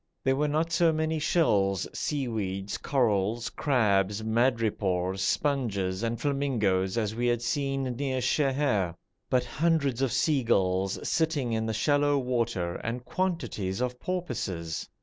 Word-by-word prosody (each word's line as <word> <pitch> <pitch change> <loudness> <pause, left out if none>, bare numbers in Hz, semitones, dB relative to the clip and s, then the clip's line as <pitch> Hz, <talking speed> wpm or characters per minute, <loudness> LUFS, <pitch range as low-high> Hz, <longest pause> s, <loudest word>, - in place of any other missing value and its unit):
There 135 0 +2
were 150 +2 +1
not 155 +3 0
so 170 -1 +4
many 160 0 -1
shells, 100 - +2
seaweeds, 105 -9 -2
corals, 115 -3 0
crabs, 105 -7 +1
madrepores, 110 -6 0
sponges, 100 -7 0
and 115 0 -2
flamingoes 115 -9 0
as 110 -2 0
we 120 +2 -1
had 120 -1 +1
seen 135 -1 -1
near 130 +1 -2
Sheher, 130 - +1 0.3
but 125 -1 +2
hundreds 140 -3 +1
of 135 -3 +1
seagulls 100 - +1
sitting 150 -7 0
in 110 0 -1
the - - 0
shallow 145 +4 +2
water, 115 -9 -1
and 120 +2 -4
quantities 165 - -2
of 125 0 -2
porpoises. 100 - -3
120 Hz, 130 wpm, -28 LUFS, 100-140 Hz, 0.3 s, so